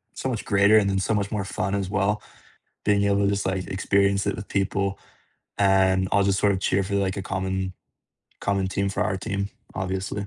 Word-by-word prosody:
so -, -, -3 dB
much 115 Hz, -4 st, -3 dB
greater 100 Hz, +1 st, +5 dB
and 100 Hz, -2 st, +3 dB
then 95 Hz, 0 st, +1 dB
so 95 Hz, -, 0 dB
much 100 Hz, 0 st, -1 dB
more 105 Hz, -3 st, -2 dB
fun 95 Hz, 0 st, -2 dB
as 100 Hz, -2 st, -2 dB
well, 105 Hz, +1 st, 0 dB, 0.6 s
being 100 Hz, -1 st, +3 dB
able 100 Hz, 0 st, +2 dB
to -, -, +3 dB
just 100 Hz, -1 st, -1 dB
like 95 Hz, -1 st, -1 dB
experience 100 Hz, +1 st, +1 dB
it 100 Hz, -, 0 dB
with 105 Hz, -, -8 dB
people, 100 Hz, 0 st, -1 dB, 0.6 s
and 95 Hz, -1 st, +3 dB
I'll 100 Hz, -, +4 dB
just 100 Hz, 0 st, +2 dB
sort 100 Hz, -, +4 dB
of 95 Hz, -, -2 dB
cheer 95 Hz, +1 st, +1 dB
for 100 Hz, +1 st, -2 dB
like 95 Hz, -1 st, 0 dB
a -, -, -3 dB
common 95 Hz, -1 st, -2 dB, 0.7 s
common 100 Hz, -1 st, 0 dB
team, 100 Hz, +1 st, -1 dB
for -, -, -1 dB
our 100 Hz, -2 st, -1 dB
team, 100 Hz, 0 st, -3 dB, 0.3 s
obviously. 95 Hz, +2 st, -3 dB
100 Hz, 210 wpm, -25 LUFS, 95-100 Hz, 0.7 s, greater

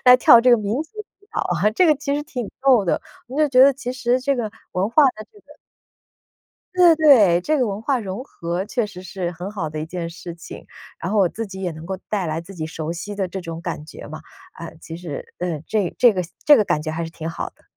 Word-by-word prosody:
来 250 Hz, 0 st, +9 dB
跳 240 Hz, -2 st, +7 dB
这 250 Hz, +1 st, +4 dB
个 240 Hz, -, +7 dB
民 210 Hz, 0 st, -2 dB
族 320 Hz, -, -19 dB
舞 410 Hz, -1 st, -16 dB
蹈， -, -, -1 dB, 0.3 s
这 360 Hz, -, +4 dB
个 305 Hz, -, +5 dB
其 280 Hz, 0 st, -2 dB
实 295 Hz, -, -1 dB
挺 250 Hz, -7 st, -5 dB
逗 255 Hz, -7 st, +5 dB
的。 170 Hz, -, 0 dB, 0.3 s
你 255 Hz, +4 st, -8 dB
就 305 Hz, -1 st, +3 dB
觉 255 Hz, -1 st, +4 dB
得 275 Hz, +1 st, +7 dB
其 250 Hz, -2 st, -5 dB
实 250 Hz, 0 st, 0 dB
这 275 Hz, +1 st, 0 dB
个 220 Hz, -3 st, -2 dB, 0.2 s
文 185 Hz, +3 st, 0 dB
化 305 Hz, -, +5 dB
的 215 Hz, -, -9 dB
这 420 Hz, -, -18 dB
个 -, -, -19 dB, 1.2 s
对， 350 Hz, -3 st, +6 dB
对， 225 Hz, -, +6 dB
这 305 Hz, +10 st, +1 dB
个 250 Hz, -4 st, +1 dB
文 200 Hz, +1 st, -4 dB
化 260 Hz, +1 st, 0 dB
融 200 Hz, +4 st, -5 dB
合 175 Hz, -7 st, -4 dB
确 230 Hz, +1 st, -1 dB
实 190 Hz, -3 st, -10 dB
是 185 Hz, -1 st, -4 dB
很 180 Hz, +4 st, -7 dB
好 175 Hz, -7 st, -4 dB
的 155 Hz, -, -5 dB
一 155 Hz, -, -4 dB
件 170 Hz, 0 st, -5 dB
事 170 Hz, 0 st, -9 dB
情。 170 Hz, -, -11 dB, 0.3 s
然 185 Hz, -, -4 dB
后 215 Hz, -, +2 dB
我 190 Hz, -, +5 dB
自 225 Hz, +6 st, -5 dB
己 190 Hz, 0 st, -8 dB
也 180 Hz, -2 st, -2 dB
能 155 Hz, +1 st, -10 dB
够 190 Hz, +1 st, -4 dB
带 200 Hz, -5 st, -1 dB
来 155 Hz, +1 st, -2 dB
自 185 Hz, +4 st, -12 dB
己 160 Hz, -4 st, -5 dB
熟 160 Hz, 0 st, -5 dB
悉 205 Hz, +4 st, -6 dB
的 195 Hz, -2 st, -1 dB
这 190 Hz, +1 st, -6 dB
种 165 Hz, -1 st, -6 dB
感 170 Hz, -4 st, -5 dB
觉 -, -, -11 dB
嘛， -, -, -8 dB, 0.4 s
呃， 165 Hz, -1 st, -8 dB
其 165 Hz, 0 st, -8 dB
实， 165 Hz, -5 st, -8 dB
呃， 175 Hz, -4 st, -2 dB
这 205 Hz, -5 st, 0 dB
这 240 Hz, -3 st, +6 dB
个 185 Hz, -, -1 dB, 0.2 s
这 295 Hz, -, +9 dB
个 215 Hz, -, +4 dB
感 150 Hz, -6 st, 0 dB
觉 155 Hz, -, -4 dB
还 165 Hz, +2 st, -3 dB
是 165 Hz, -, -5 dB
挺 165 Hz, -1 st, -7 dB
好 165 Hz, -, -5 dB
的。 -, -, -29 dB
200 Hz, 275 characters per minute, -21 LUFS, 170-250 Hz, 1.2 s, 来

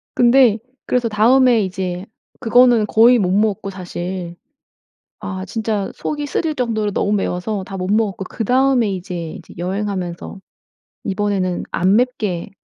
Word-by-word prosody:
근데 240 Hz, -2 st, +5 dB, 0.3 s
그래서 245 Hz, -2 st, +1 dB
다음에 240 Hz, +2 st, +4 dB
이제 185 Hz, -1 st, -4 dB, 0.3 s
그거는 240 Hz, -1 st, +4 dB
거의 235 Hz, +3 st, +5 dB
못 185 Hz, -3 st, +1 dB
먹었고 205 Hz, -1 st, 0 dB
사실. 180 Hz, -1 st, -6 dB, 0.9 s
아 190 Hz, -1 st, -5 dB
진짜 215 Hz, -1 st, -2 dB
속이 295 Hz, -1 st, -4 dB
쓰릴 310 Hz, +1 st, -1 dB
정도로 220 Hz, -5 st, -1 dB
너무 205 Hz, -, 0 dB
매워서 195 Hz, 0 st, -2 dB
다 195 Hz, -, -7 dB
못 185 Hz, 0 st, -3 dB
먹었고 210 Hz, -3 st, 0 dB
그다음에 250 Hz, +1 st, +1 dB
이제 175 Hz, -3 st, -6 dB
이제 -, -, -12 dB
여행하면서 185 Hz, -1 st, -4 dB, 0.7 s
이번에는 195 Hz, -3 st, -1 dB
'안 185 Hz, +4 st, +2 dB
맵게 215 Hz, -8 st, -1 dB
205 Hz, 290 characters per minute, -19 LUFS, 185-235 Hz, 0.9 s, 근데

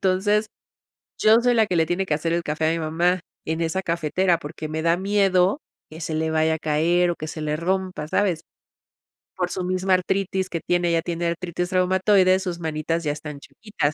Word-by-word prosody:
entonces 205 Hz, +3 st, +2 dB, 0.7 s
yo 215 Hz, +1 st, +6 dB
soy 245 Hz, 0 st, +3 dB
la 220 Hz, -2 st, +4 dB
que 180 Hz, -, -1 dB
le 160 Hz, -, +4 dB
tiene 190 Hz, +3 st, -1 dB
que 155 Hz, -, +1 dB
hacer 165 Hz, +2 st, -1 dB
el 170 Hz, 0 st, 0 dB
café 155 Hz, +1 st, 0 dB
a -, -, +2 dB
mi 165 Hz, -, -1 dB
mamá 170 Hz, +3 st, +1 dB, 0.2 s
en 160 Hz, +1 st, -2 dB
esa 165 Hz, +3 st, -1 dB
cafetera 170 Hz, +1 st, +1 dB
porque 155 Hz, 0 st, -7 dB
me 160 Hz, +1 st, -3 dB
da 165 Hz, +1 st, +3 dB
miedo 195 Hz, -, +2 dB, 0.3 s
que 160 Hz, -, -10 dB
se 160 Hz, -1 st, -3 dB
le 160 Hz, 0 st, 0 dB
vaya 160 Hz, 0 st, +2 dB
a -, -, -4 dB
caer 170 Hz, +4 st, +2 dB
o 170 Hz, -, -3 dB
que 155 Hz, -, -6 dB
se 155 Hz, -, -6 dB
le 150 Hz, 0 st, -1 dB
rompa, 185 Hz, -2 st, -2 dB
¿sabes?, 180 Hz, -4 st, 0 dB, 0.9 s
por 180 Hz, -1 st, -1 dB
su 185 Hz, -, -3 dB
misma 185 Hz, +1 st, +1 dB
artritis 190 Hz, +1 st, -1 dB
que 165 Hz, -, -4 dB
tiene, 175 Hz, -1 st, +1 dB
ella 165 Hz, -1 st, +2 dB
tiene 170 Hz, 0 st, -2 dB
artritis 175 Hz, +1 st, -3 dB
reumatoide, 185 Hz, +1 st, +3 dB
sus 180 Hz, -3 st, -4 dB
manitas 160 Hz, +1 st, -2 dB
ya 145 Hz, -, 0 dB
están 150 Hz, -1 st, -7 dB
chuequitas, 205 Hz, -5 st, -3 dB
175 Hz, 205 wpm, -23 LUFS, 160-185 Hz, 0.9 s, yo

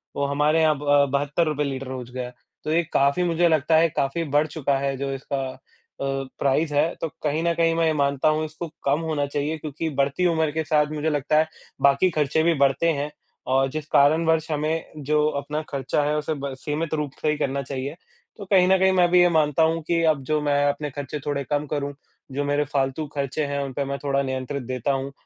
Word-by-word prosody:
वो 140 Hz, -, 0 dB
हमारे 150 Hz, +3 st, +2 dB
यहाँ 155 Hz, -1 st, +4 dB
ब 145 Hz, -1 st, +3 dB
72 145 Hz, +4 st, +1 dB
रुपये 150 Hz, -1 st, 0 dB
लीटर 135 Hz, -1 st, -4 dB
हो 130 Hz, -1 st, -5 dB
गया 125 Hz, -1 st, -3 dB
है। 125 Hz, -, -9 dB, 0.3 s
तो 155 Hz, -, -2 dB
ये 170 Hz, +1 st, +3 dB
काफ़ी 140 Hz, +6 st, +3 dB
मुझे 170 Hz, 0 st, +2 dB
लगता 160 Hz, 0 st, +2 dB
है 165 Hz, 0 st, +4 dB
काफ़ी 140 Hz, +4 st, -1 dB
बढ़ 150 Hz, +1 st, +1 dB
चुका 140 Hz, -3 st, -1 dB
है 140 Hz, 0 st, -1 dB
जो 135 Hz, +1 st, -3 dB
इसका 135 Hz, 0 st, -3 dB, 0.5 s
अ, -, -, -3 dB, 0.4 s
प्राइस 150 Hz, +3 st, +1 dB
है। 150 Hz, +4 st, +2 dB
तो 165 Hz, -, 0 dB, 0.2 s
कहीं 150 Hz, +1 st, 0 dB
न 170 Hz, 0 st, +2 dB
कहीं 165 Hz, -1 st, +2 dB
मैं 165 Hz, 0 st, +2 dB
ये 160 Hz, -, +2 dB
मानता 140 Hz, 0 st, +1 dB
हूँ 155 Hz, +1 st, +1 dB
इसको 160 Hz, +2 st, -6 dB, 0.2 s
कम 140 Hz, +3 st, +2 dB
होना 155 Hz, -3 st, -1 dB
चाहिए 145 Hz, +2 st, -2 dB
क्योंकि 155 Hz, +1 st, -4 dB
बढ़ती 140 Hz, +6 st, +1 dB
उम्र 160 Hz, -2 st, +1 dB
के 160 Hz, +1 st, -2 dB
साथ 150 Hz, -1 st, +2 dB
मुझे 155 Hz, +1 st, -1 dB
लगता 150 Hz, +1 st, +1 dB
है 160 Hz, -, +2 dB, 0.3 s
बाकी 140 Hz, +6 st, +4 dB
खर्चे 150 Hz, +2 st, +2 dB
भी 170 Hz, -, +4 dB
बढ़ते 140 Hz, +4 st, +3 dB
हैं 145 Hz, +1 st, -3 dB, 0.4 s
और 135 Hz, 0 st, +3 dB
जिस 155 Hz, -1 st, -4 dB
कारणवश 160 Hz, +3 st, +3 dB
हमें 155 Hz, +2 st, -1 dB, 0.2 s
जो 150 Hz, 0 st, +2 dB
अपना 150 Hz, +2 st, -4 dB
खर्चा 140 Hz, +1 st, -1 dB
है 150 Hz, +1 st, 0 dB
उसे 150 Hz, +1 st, -2 dB
ब 140 Hz, -1 st, -4 dB
सीमित 155 Hz, +1 st, -3 dB
रूप 150 Hz, -3 st, -2 dB
से 155 Hz, -, +1 dB
ही 150 Hz, -, 0 dB
करना 140 Hz, -2 st, -1 dB
चाहिए। 135 Hz, +2 st, -5 dB, 0.4 s
तो 200 Hz, -, -8 dB
कहीं 185 Hz, -2 st, +4 dB
न 190 Hz, 0 st, +5 dB
कहीं 190 Hz, 0 st, +4 dB
मैं 175 Hz, -2 st, +4 dB
भी 180 Hz, -, +6 dB
ये 175 Hz, -, +5 dB
मानता 155 Hz, -1 st, +2 dB
हूँ 165 Hz, +1 st, +1 dB
कि 170 Hz, -1 st, +2 dB
अब 140 Hz, -3 st, -3 dB
जो 155 Hz, +3 st, 0 dB
मैं 145 Hz, -1 st, +2 dB
अपने 145 Hz, +1 st, -3 dB
खर्चे 145 Hz, +2 st, -5 dB
थोड़े 140 Hz, -1 st, -1 dB
कम 145 Hz, +3 st, -1 dB
करूँ, 145 Hz, -1 st, -3 dB, 0.4 s
जो 145 Hz, +2 st, -2 dB
मेरे 145 Hz, +1 st, +1 dB
फालतू 135 Hz, +2 st, 0 dB
खर्चे 140 Hz, +2 st, -1 dB
हैं 140 Hz, 0 st, -2 dB
उन 135 Hz, -2 st, -6 dB
पे 140 Hz, -, -2 dB
मैं 140 Hz, 0 st, -3 dB
थोड़ा 140 Hz, -1 st, +1 dB
नियंत्रित 130 Hz, +1 st, -3 dB
देता 125 Hz, +2 st, -2 dB
हूँ 135 Hz, +1 st, -3 dB
150 Hz, 230 wpm, -24 LUFS, 140-160 Hz, 0.5 s, भी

